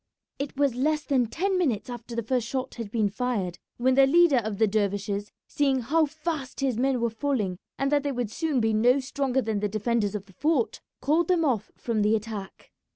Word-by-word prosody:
It 280 Hz, -1 st, -4 dB
was 280 Hz, -3 st, +2 dB
less 300 Hz, +5 st, 0 dB
than 255 Hz, -4 st, +1 dB
ten 370 Hz, -, 0 dB
minutes 260 Hz, -, 0 dB
after 240 Hz, -1 st, -7 dB
the 235 Hz, -, -1 dB
first 240 Hz, 0 st, 0 dB
shot 260 Hz, +1 st, -3 dB
had 230 Hz, -4 st, -6 dB
been 215 Hz, -1 st, +1 dB
fired 200 Hz, -5 st, -2 dB, 0.2 s
when 255 Hz, +2 st, +3 dB
the 270 Hz, +1 st, +6 dB
leader 335 Hz, -1 st, +5 dB
of 220 Hz, -3 st, -4 dB
the 220 Hz, -, +4 dB
dervishes, 205 Hz, -1 st, -1 dB
seeing 275 Hz, -3 st, +1 dB
how 310 Hz, +6 st, +2 dB
fast 305 Hz, -2 st, -4 dB
his 265 Hz, -3 st, +1 dB
men 265 Hz, 0 st, +2 dB
were 235 Hz, -1 st, 0 dB
falling 220 Hz, -7 st, -1 dB, 0.2 s
and 275 Hz, +1 st, 0 dB
that 290 Hz, -1 st, +3 dB
they 285 Hz, 0 st, -2 dB
would 245 Hz, -5 st, -3 dB
soon 310 Hz, 0 st, 0 dB
be 225 Hz, -1 st, +2 dB
no 245 Hz, +5 st, +4 dB
stronger 265 Hz, -1 st, -1 dB
than 220 Hz, -2 st, -1 dB
the 210 Hz, 0 st, -1 dB
defenders 215 Hz, 0 st, 0 dB
of 205 Hz, -1 st, -4 dB
the 190 Hz, -, -19 dB
fort, 290 Hz, -, 0 dB, 0.2 s
called 315 Hz, +4 st, +2 dB
them 350 Hz, -3 st, +2 dB
off 230 Hz, -7 st, 0 dB
from 230 Hz, -3 st, -1 dB
the 210 Hz, +2 st, +3 dB
attack. 215 Hz, -3 st, -6 dB
245 Hz, 215 wpm, -26 LUFS, 215-280 Hz, 0.2 s, the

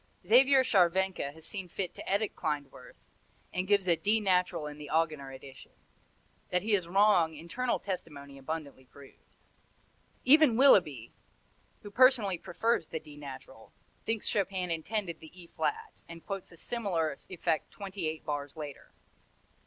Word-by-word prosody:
Xaver 260 Hz, +6 st, +6 dB
Scharwenka 190 Hz, -, +2 dB
has 160 Hz, 0 st, -14 dB
seen 190 Hz, -1 st, -5 dB
fit 185 Hz, 0 st, -4 dB
to -, -, -8 dB
edit 200 Hz, +2 st, 0 dB
Klindworth, 145 Hz, -4 st, -5 dB, 0.6 s
and 185 Hz, +1 st, -2 dB
gives 200 Hz, -2 st, +3 dB
a 170 Hz, -, +5 dB
D 210 Hz, +6 st, +1 dB
natural 180 Hz, -6 st, +1 dB
in 150 Hz, 0 st, -8 dB
the 145 Hz, -1 st, -9 dB
Augener 155 Hz, -4 st, 0 dB
edition. 130 Hz, 0 st, -13 dB, 0.8 s
That 180 Hz, +1 st, 0 dB
he 220 Hz, 0 st, 0 dB
is 185 Hz, -4 st, +1 dB
wrong 180 Hz, -4 st, +4 dB
internal 235 Hz, +11 st, -2 dB
testimony 140 Hz, -7 st, -7 dB
abundantly 140 Hz, -2 st, -6 dB
proves. 140 Hz, +1 st, -19 dB, 0.7 s
Even 280 Hz, -3 st, +6 dB
Willeby, 160 Hz, -, +4 dB, 0.7 s
who 205 Hz, -, -9 dB
personally 235 Hz, -7 st, +4 dB
prefers 225 Hz, -1 st, -1 dB
the 160 Hz, -, -4 dB
D 150 Hz, -2 st, -14 dB
natural, 140 Hz, -3 st, -11 dB, 0.3 s
thinks 225 Hz, -1 st, -1 dB
Chopin 190 Hz, -3 st, -1 dB
intended 170 Hz, +1 st, -3 dB
the 160 Hz, -, -12 dB
E 175 Hz, -, -11 dB
flat, 445 Hz, -, -4 dB
and 165 Hz, 0 st, -10 dB
quotes 195 Hz, -3 st, -5 dB
a 170 Hz, -, -14 dB
similar 175 Hz, -9 st, -2 dB
effect 170 Hz, -3 st, -1 dB
twenty 195 Hz, -4 st, -5 dB
eight 155 Hz, 0 st, -5 dB
bars 145 Hz, -1 st, -4 dB
later. 145 Hz, -3 st, -9 dB
175 Hz, 145 wpm, -30 LUFS, 155-205 Hz, 0.8 s, Xaver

